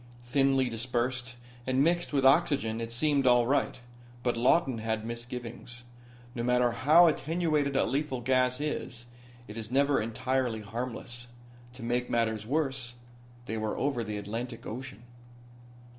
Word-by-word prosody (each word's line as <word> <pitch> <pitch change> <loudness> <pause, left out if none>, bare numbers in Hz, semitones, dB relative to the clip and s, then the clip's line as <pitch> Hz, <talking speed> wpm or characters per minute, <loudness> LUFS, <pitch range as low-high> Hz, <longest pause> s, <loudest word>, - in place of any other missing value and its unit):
Thinly 135 +1 +2
dispersed, 125 +1 -2 0.3
and 130 +1 +3
mixed 175 +2 +1
with 135 -2 +1
oxygen 135 -6 +3
it 115 0 -4
seemed 140 +2 +2
all 120 -1 +5
right. 140 +4 +1 0.5
But 120 - +1
Lawton 130 +1 +3
had 110 0 -2
misgivings. 120 +1 -6 0.5
No 120 - -3
matter 125 0 +3
how 150 +9 +6
attenuated 155 -3 +1
a - - +4
lethal 135 0 -1
gas 125 +1 +2
is 125 -5 -3 0.4
it 105 - -9
is 110 -1 -5
never 140 +2 +3
entirely 115 +1 -1
harmless. 120 +2 -4 0.5
To 125 -1 -10
make 120 +1 -1
matters 110 -2 0
worse, 135 -4 -1 0.5
they 110 - -3
were 110 0 -2
over 135 -4 0
the 105 -1 -4
Atlantic 115 +4 -5
Ocean. 120 -1 -7
125 Hz, 140 wpm, -29 LUFS, 115-135 Hz, 0.5 s, how